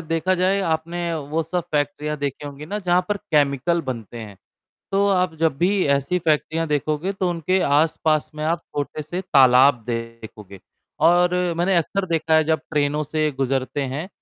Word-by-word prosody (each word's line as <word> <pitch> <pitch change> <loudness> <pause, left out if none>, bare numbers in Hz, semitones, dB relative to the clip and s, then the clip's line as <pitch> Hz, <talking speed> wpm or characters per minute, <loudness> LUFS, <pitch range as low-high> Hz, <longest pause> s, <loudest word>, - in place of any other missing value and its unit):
देखा 165 +3 0
जाए 185 +2 +1
आपने 170 0 -2
वो 155 +1 -2
सब 170 +2 -3
फैक्ट्रियाँ 150 +1 -1
देखी 140 0 -4
होंगी 145 +1 -9
ना 205 +6 -3
जहाँ 180 -2 +1
पर 205 - 0
केमिकल 150 -3 +1
बनते 120 -4 -6
हैं, 105 -3 -9 0.6
तो 200 +1 +3
आप 180 -4 +1
जब 160 -4 +2
भी 190 +2 +2
ऐसी 140 +6 -1
फैक्ट्रियाँ 160 0 0
देखोगे 150 +5 -1
तो 190 -2 -1
उनके 175 +2 0
आस-पास 155 +1 +1
में 150 0 -4
आप 165 +2 -1
छोटे 145 +1 -3
से 175 +5 -5
तालाब 135 -6 +5
देखोगे 115 -4 -7 0.5
और 175 +1 +4 0.2
मैंने 180 +3 +1
अक्सर 185 +4 0
देखा 165 -2 0
है 160 0 +4
जब 160 +1 +1
ट्रेनों 150 -1 0
से 155 +1 -1
गुज़रते 135 +1 -1
हैं, 145 +7 -5
155 Hz, 170 wpm, -22 LUFS, 145-175 Hz, 0.6 s, तालाब